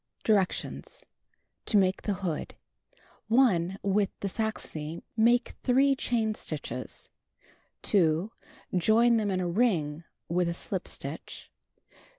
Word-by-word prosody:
Directions: 200 Hz, -4 st, -1 dB, 0.6 s
To 210 Hz, -, +3 dB
Make 190 Hz, -1 st, +2 dB
the 205 Hz, -, -1 dB
Hood. 165 Hz, -4 st, -3 dB, 0.7 s
1. 195 Hz, -7 st, +3 dB
With 200 Hz, 0 st, +2 dB
the 200 Hz, -, -1 dB
Saxony, 170 Hz, -7 st, -3 dB
make 235 Hz, +2 st, +4 dB
3 270 Hz, +2 st, +4 dB
chain 230 Hz, -4 st, 0 dB
stitches. 145 Hz, -9 st, -5 dB, 0.7 s
2. 175 Hz, +1 st, +2 dB, 0.4 s
Join 230 Hz, +6 st, +4 dB
them 210 Hz, -2 st, 0 dB
in 185 Hz, -1 st, 0 dB
a 180 Hz, -, -1 dB
ring 170 Hz, -6 st, +1 dB, 0.2 s
with 175 Hz, 0 st, +1 dB
a 170 Hz, -, -3 dB
slip -, -, -3 dB
stitch. -, -, -6 dB
200 Hz, 115 wpm, -28 LUFS, 170-225 Hz, 0.7 s, make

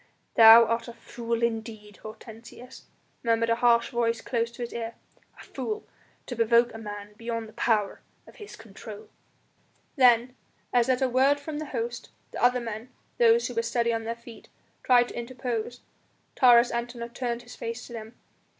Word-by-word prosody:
"Thou 225 Hz, +1 st, +9 dB
art 230 Hz, +1 st, -2 dB
a 235 Hz, -, -8 dB
fool 235 Hz, 0 st, -4 dB
indeed, 220 Hz, -2 st, -4 dB
Hortensius," 225 Hz, +3 st, -12 dB, 0.4 s
murmured 230 Hz, -1 st, +1 dB
a -, -, +4 dB
harsh 235 Hz, -1 st, +3 dB
voice 235 Hz, -1 st, 0 dB
close 235 Hz, -1 st, -2 dB
to 235 Hz, +1 st, -8 dB
his 235 Hz, -, -6 dB
ear; 230 Hz, -1 st, -5 dB, 0.4 s
"a -, -, -11 dB
fool 430 Hz, -1 st, -5 dB, 0.4 s
to 245 Hz, -, -6 dB
provoke 235 Hz, +1 st, +3 dB
a 225 Hz, -, -8 dB
man 205 Hz, -1 st, -8 dB
beyond 230 Hz, -1 st, -4 dB
the 215 Hz, -, -15 dB
power 215 Hz, -4 st, 0 dB, 0.2 s
of -, -, -17 dB
his 420 Hz, -, -10 dB
control." 215 Hz, 0 st, -11 dB, 0.9 s
Then 250 Hz, -2 st, +4 dB, 0.4 s
as 245 Hz, 0 st, +3 dB
at 260 Hz, +1 st, +2 dB
a -, -, +3 dB
word 265 Hz, +3 st, +3 dB
from 295 Hz, +1 st, -6 dB
the 310 Hz, -, -6 dB
host, 240 Hz, -1 st, -5 dB, 0.2 s
the -, -, -5 dB
other 250 Hz, 0 st, +4 dB
men 225 Hz, 0 st, -7 dB, 0.3 s
those 235 Hz, 0 st, +5 dB
who 250 Hz, -, -4 dB
were 230 Hz, -, 0 dB
steady 235 Hz, 0 st, 0 dB
on 225 Hz, 0 st, -2 dB
their 230 Hz, +1 st, -3 dB
feet 235 Hz, -1 st, -14 dB, 0.3 s
tried 245 Hz, -1 st, +4 dB
to -, -, -10 dB
interpose, 240 Hz, -1 st, -5 dB, 0.5 s
Taurus 245 Hz, -2 st, +6 dB
Antinor 235 Hz, 0 st, -5 dB
turned 240 Hz, -2 st, -3 dB
his 245 Hz, -, -12 dB
face 230 Hz, +1 st, -6 dB
to 240 Hz, -, -12 dB
them. 225 Hz, 0 st, -9 dB
235 Hz, 175 wpm, -26 LUFS, 230-245 Hz, 0.9 s, Thou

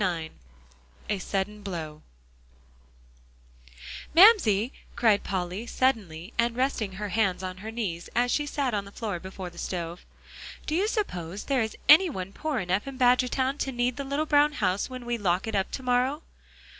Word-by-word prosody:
IX 170 Hz, -4 st, -1 dB, 0.8 s
A 205 Hz, -, 0 dB
SUDDEN 200 Hz, +3 st, -3 dB
BLOW 160 Hz, -6 st, -6 dB, 2.1 s
"Mamsie," 300 Hz, -, +6 dB, 0.2 s
cried 215 Hz, -3 st, +3 dB
Polly, 190 Hz, +4 st, -3 dB
suddenly, 205 Hz, -9 st, -1 dB
and 235 Hz, 0 st, +2 dB
resting 250 Hz, -6 st, -1 dB
her 205 Hz, +2 st, -4 dB
hands 190 Hz, -2 st, +1 dB
on 185 Hz, 0 st, -5 dB
her 210 Hz, +4 st, -7 dB
knees 200 Hz, -7 st, -4 dB
as 245 Hz, +1 st, +2 dB
she 295 Hz, -1 st, 0 dB
sat 275 Hz, -4 st, -1 dB
on 200 Hz, -1 st, -1 dB
the 200 Hz, -, -12 dB
floor 205 Hz, -5 st, -4 dB
before 185 Hz, 0 st, -7 dB
the 170 Hz, -, -12 dB
stove, 170 Hz, -1 st, -4 dB, 0.6 s
"do 305 Hz, -, -3 dB
you 380 Hz, +6 st, +2 dB
suppose 195 Hz, -, -3 dB
there 270 Hz, -3 st, +1 dB
is 220 Hz, -1 st, -3 dB
any 330 Hz, +5 st, +8 dB
one 190 Hz, -, -6 dB
poor 310 Hz, -4 st, -2 dB
enough 185 Hz, +3 st, -1 dB
in 270 Hz, -1 st, -6 dB
Badgertown 255 Hz, +2 st, +2 dB
to 270 Hz, -, -1 dB
need 245 Hz, 0 st, 0 dB
the 280 Hz, -, -3 dB
little 280 Hz, +3 st, -1 dB
brown 295 Hz, 0 st, +4 dB
house 195 Hz, -5 st, 0 dB
when 255 Hz, -1 st, -8 dB
we 240 Hz, -1 st, -2 dB
lock 180 Hz, -2 st, +1 dB
it 220 Hz, -, -4 dB
up 195 Hz, -2 st, 0 dB
to 265 Hz, -, -6 dB
morrow?" 255 Hz, +5 st, +1 dB
220 Hz, 170 wpm, -27 LUFS, 185-260 Hz, 2.1 s, any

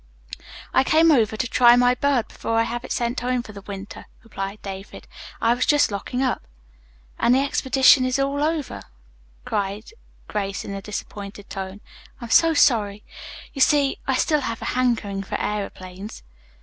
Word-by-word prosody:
"I -, -, +4 dB
came 320 Hz, +4 st, +4 dB
over 220 Hz, -6 st, +2 dB
to 250 Hz, -, -1 dB
try 240 Hz, +1 st, +6 dB
my 245 Hz, 0 st, +4 dB
bird 265 Hz, -2 st, +1 dB
before 230 Hz, -, -4 dB
I 225 Hz, -, +4 dB
have 240 Hz, +1 st, -4 dB
it -, -, -8 dB
sent 240 Hz, +1 st, -1 dB
home 250 Hz, 0 st, -1 dB
for 215 Hz, -, -11 dB
the 200 Hz, -1 st, -10 dB
winter," 200 Hz, 0 st, -9 dB, 0.2 s
replied 200 Hz, -2 st, -6 dB
David. 195 Hz, 0 st, -8 dB, 0.3 s
"I 230 Hz, -, +3 dB
was 245 Hz, +1 st, -1 dB
just 295 Hz, -6 st, +3 dB
locking 250 Hz, +6 st, -3 dB
up." 255 Hz, -, 0 dB, 0.8 s
"And 240 Hz, -, +4 dB
the 265 Hz, -, +3 dB
exhibition 265 Hz, -1 st, +4 dB
is 255 Hz, 0 st, 0 dB
all 275 Hz, +1 st, 0 dB
over," 310 Hz, -2 st, -2 dB, 0.6 s
cried 205 Hz, -, -3 dB, 0.4 s
Grace 200 Hz, -2 st, -3 dB
in 200 Hz, -, -6 dB
a 195 Hz, -, -5 dB
disappointed 205 Hz, 0 st, -8 dB
tone. 195 Hz, +1 st, -6 dB, 0.4 s
"I'm 235 Hz, -2 st, -8 dB
so 330 Hz, -1 st, +5 dB
sorry. 210 Hz, -7 st, +3 dB, 0.5 s
You 275 Hz, -, -4 dB
see, 280 Hz, -1 st, +3 dB
I 265 Hz, -, +2 dB
still 300 Hz, +3 st, +2 dB
have 230 Hz, -3 st, -4 dB
a -, -, -2 dB
hankering 230 Hz, -6 st, 0 dB
for 195 Hz, -, -5 dB
aëroplanes." 195 Hz, -1 st, -5 dB
235 Hz, 170 wpm, -23 LUFS, 200-260 Hz, 0.8 s, try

